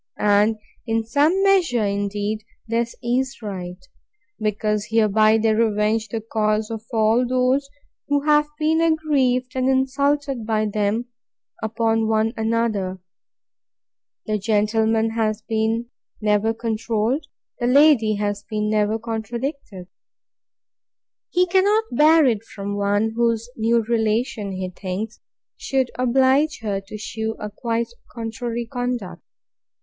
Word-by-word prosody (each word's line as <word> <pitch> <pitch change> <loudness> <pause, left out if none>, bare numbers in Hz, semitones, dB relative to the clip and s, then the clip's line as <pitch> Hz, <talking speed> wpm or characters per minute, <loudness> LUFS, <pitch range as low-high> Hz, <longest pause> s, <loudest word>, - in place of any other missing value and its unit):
And, 210 +1 +3 0.3
in 225 0 0
some 300 - +2
measure, 350 - +3
indeed, 205 +1 -2 0.2
this 230 +1 -1
is 255 +3 -1
right; 180 -3 -5 0.6
because 210 0 -1
hereby 215 0 +4
they 220 0 +2
revenge 215 0 +1
the 225 +1 -3
cause 215 0 -1
of 225 -1 -5
all 225 +1 +3
those 255 +2 +1 0.4
who 285 0 +1
have 300 0 +3
been 315 +1 +2
aggrieved 280 -6 +1
and 260 0 +1
insulted 275 0 +1
by 215 -1 0
them, 210 +2 0 0.6
upon 225 0 0
one 220 +1 +1
another. 220 -4 -1 1.3
The 215 -1 -1
gentleman 220 +1 +1
has 220 -1 -1 0.8
never 210 +1 +2
been 225 - -9
controlled: 230 +5 -1 0.3
the 240 - 0
lady 255 -5 +5
has 205 0 -2
never 210 0 +1
been - - -18
contradicted. 230 - -5 1.4
He 360 +1 +3
cannot 395 +4 +3
bear 310 +4 +5
it 225 -4 +1
from 200 -2 -6
one 205 +2 +1
whose 230 0 0
new 230 +1 +2
relation, 220 -2 -1
he 185 0 -3
thinks, 195 +5 -5 0.4
should 265 -2 -1
oblige 265 +4 +2
her 200 -2 -2
to 215 - -7
shew 220 +1 -4
a 210 0 -5
quite 230 +2 -2 0.2
contrary 235 0 -4
conduct. 245 -5 -4
225 Hz, 120 wpm, -22 LUFS, 215-255 Hz, 1.4 s, lady